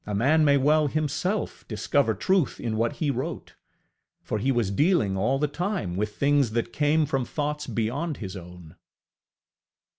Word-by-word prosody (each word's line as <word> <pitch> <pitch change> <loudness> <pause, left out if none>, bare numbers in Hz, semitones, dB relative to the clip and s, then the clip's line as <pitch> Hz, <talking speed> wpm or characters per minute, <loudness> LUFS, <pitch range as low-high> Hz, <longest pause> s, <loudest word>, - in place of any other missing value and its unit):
A 105 - -2
man 145 +9 +3
may 140 -1 +5
well 150 +2 +3
himself 155 +7 -2
discover 110 +2 +1
truth 180 - +1
in 115 -2 -2
what 115 +1 0
he 150 -3 -1
wrote; 140 +7 -5 0.7
for 110 - -2
he 130 +6 +1
was 120 -6 0
dealing 145 - +2
all 110 +8 +1
the 150 +2 +1
time 150 - -3
with 105 +2 -2
things 140 -5 +2
that 115 0 -2
came 150 +1 +2
from 135 -2 -1
thoughts 150 +3 -3
beyond 135 +8 -2
his 95 -3 -6
own. 90 -3 -11
135 Hz, 160 wpm, -26 LUFS, 110-150 Hz, 0.7 s, may